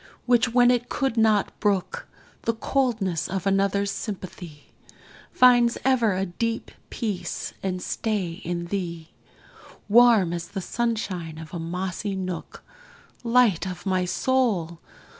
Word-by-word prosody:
which, 245 -1 +3
when 245 0 +5
it 245 -1 0
could 270 -4 -1
not 220 -3 +3
brook 200 -4 -1 0.4
The 230 - +1
coldness 225 - 0
of 190 0 -3
another's 195 0 +1
sympathy, 180 -7 -7 0.6
Finds 245 -2 +5
ever 240 -7 +3
a 190 - 0
deep 225 +6 -3 0.2
peace 210 -6 -4
and 185 -1 -3
stay 200 -6 -2
in 170 0 -3
thee, 170 -4 -4 0.8
Warm 220 -5 +5
as 170 -1 -4
the 195 - -5
sunshine 190 -7 -3
of 160 -1 -10
a 170 - -4
mossy 180 +4 -3
nook; 185 -2 -6 0.6
Light 230 -7 +3
of 180 -1 -7
my 185 -1 +1
soul! 185 -5 0
195 Hz, 125 wpm, -25 LUFS, 180-230 Hz, 0.8 s, when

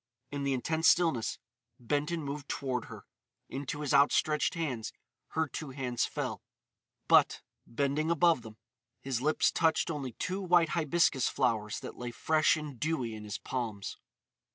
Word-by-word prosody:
In 145 0 -3
the 140 -1 +1
intense 160 +5 +2
stillness 165 -10 +2 0.4
Benton 150 +6 -1
moved 140 0 -5
toward 130 -3 -2
her. - - -11 0.4
Into 140 +2 -4
his 145 -1 -1
outstretched 145 +3 +3
hands 135 -10 -3 0.4
her 160 0 +1
two 150 +1 -6
hands 130 -3 -1
fell; - - -4 0.7
but, - - +5 0.2
bending 140 +5 0
above 170 -4 +4
them, 110 -1 -11 0.4
his 130 -3 -2
lips 155 +3 +3
touched 160 0 +2
only 135 -6 -4
two 185 - -3
white 175 -3 +4
hibiscus 155 -5 +2
flowers 105 -2 0
that - - -8
lay 120 0 -4
fresh 155 +6 +2
and 150 -5 -7
dewy 140 -8 -1
in 105 -1 -8
his 105 0 -4
palms. 115 -6 -4
145 Hz, 150 wpm, -31 LUFS, 125-160 Hz, 0.7 s, but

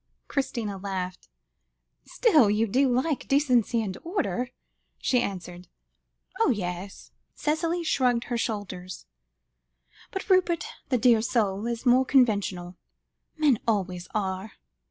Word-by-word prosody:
Christina 230 -8 -2
laughed. 185 -2 -5 0.8
"Still, 310 - +4
you 210 +2 +2
do 260 +6 +2
like 260 +4 0
decency 250 -5 +2
and 190 -3 -4
order," 335 - -2 0.5
she 250 -2 +1
answered. 180 -2 -5 0.7
"Ah! - - +4
yes," 185 -3 -4 0.2
Cicely 330 +3 -1
shrugged 250 -6 +2
her 245 - -3
shoulders; 185 -5 -4 1.0
"but 385 - -5
Rupert, 365 -4 +3 0.2
the 255 - +2
dear 235 -2 +4
soul, 215 -3 0
is 235 +1 -4
more 250 +1 +5
conventional. 200 -9 +1 0.6
Men 290 -7 +3
always 185 -5 -1
are. 190 0 -2
230 Hz, 115 wpm, -27 LUFS, 195-265 Hz, 1.0 s, more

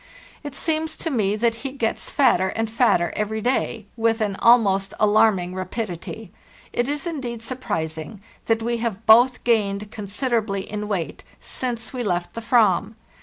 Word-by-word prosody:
It 290 -2 -6
seems 320 +1 -1
to 325 - -3
me 210 -6 +1
that 230 +1 +1
he 270 +3 -5
gets 235 -5 -2
fatter 225 -9 +3
and 225 +3 -2
fatter 225 -7 +2
every 215 +1 -1
day, 235 -2 -1
with 225 0 +1
an 205 -3 -1
almost 200 -5 +4
alarming 210 -4 +3
rapidity. 185 +1 -5 0.4
It 240 +2 0
is 290 +2 -2
indeed 250 -9 -4
surprising 165 -8 -4 0.3
that 225 0 +1
we 235 +1 0
have 225 -2 -3
both 245 +3 +6
gained 210 -3 +1
con 210 -2 -7
siderably 210 -3 -1
in 210 0 -5
weight 190 -6 -3 0.2
since 240 -2 -4
we 250 - -3
left 175 -5 -2
the 230 - -6
Aram. 220 -2 +3
225 Hz, 160 wpm, -23 LUFS, 200-240 Hz, 0.4 s, both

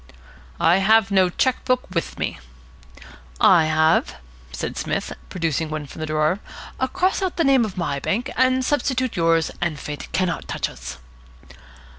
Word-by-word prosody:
"I 170 +3 +4
have 215 +1 +4
no 190 -2 +4
cheque 255 +8 0
book 255 0 +1
with 170 - -2
me." - - -3 1.0
"I 170 -4 +6
have," 155 0 +2 0.4
said - - -4
Psmith, - - -3 0.2
producing 165 -3 -1
one 155 -1 -4
from 150 - -10
a 155 - -3
drawer. 155 +4 +1 0.5
"Cross 375 +2 +1
out 375 -2 -2
the 335 - +3
name 270 -4 +4
of 200 -4 -7
my 145 -6 -1
bank, 220 - -2 0.3
substitute 260 -3 0
yours, 165 -2 +2
and 170 -4 -1
fate 145 0 -7
cannot 185 -1 -1
touch - - -2
us." 65 0 -8
175 Hz, 150 wpm, -22 LUFS, 155-230 Hz, 1.0 s, I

